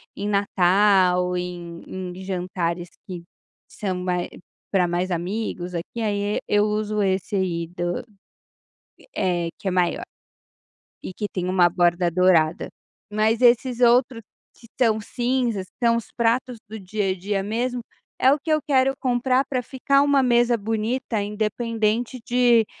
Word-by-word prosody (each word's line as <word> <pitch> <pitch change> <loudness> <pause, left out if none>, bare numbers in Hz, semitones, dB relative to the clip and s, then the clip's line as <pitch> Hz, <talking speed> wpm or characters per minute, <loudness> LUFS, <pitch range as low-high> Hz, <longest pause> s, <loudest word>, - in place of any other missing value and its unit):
em 205 +1 -4
Natal, 185 -2 +3
em 175 -1 -6
em 185 0 -7
jantares 180 -2 -3 0.2
que 180 -2 -7 0.4
são 190 -3 -4
mais 180 -1 -1 0.4
para 185 -3 +3
mais 175 +2 -1
amigos 180 0 -3
aqui, 175 +7 -5
aí 205 -1 -1
eu 210 0 +3
uso 210 0 -1
esse 190 +1 -1
aí 170 -3 -1
do, 175 +2 -3 1.1
é 175 -3 0
que 195 - -4
é - - +1
maior, 180 -1 0 1.0
e 185 - -8
que 210 +1 -3
tem 180 -1 -2
uma 180 -1 +4
borda 175 0 +2
dourada. 170 -2 +3 0.4
Mas 215 +2 +1
esses 245 0 +3
outros 245 0 +4 0.3
que 230 - -17
estão 225 -2 +1
cinzas 240 -3 -1
que 235 - -4
são 230 0 +4
os 235 - -4
pratos 240 +1 0
do 220 +1 -7
dia 195 0 -2
a - - 0
dia 195 +2 -2
mesmo 240 +4 -2 0.4
é 260 - +5
o 295 - +2
que 320 - -6
eu 310 - +4
quero 270 -1 +3
comprar 255 0 +1
para 255 -2 -1
ficar 275 +3 +1
uma 285 -2 +3
mesa 240 -1 +3
bonita 220 +1 -2
independente 220 +3 -1
de 240 -3 +4
210 Hz, 145 wpm, -23 LUFS, 180-240 Hz, 1.1 s, é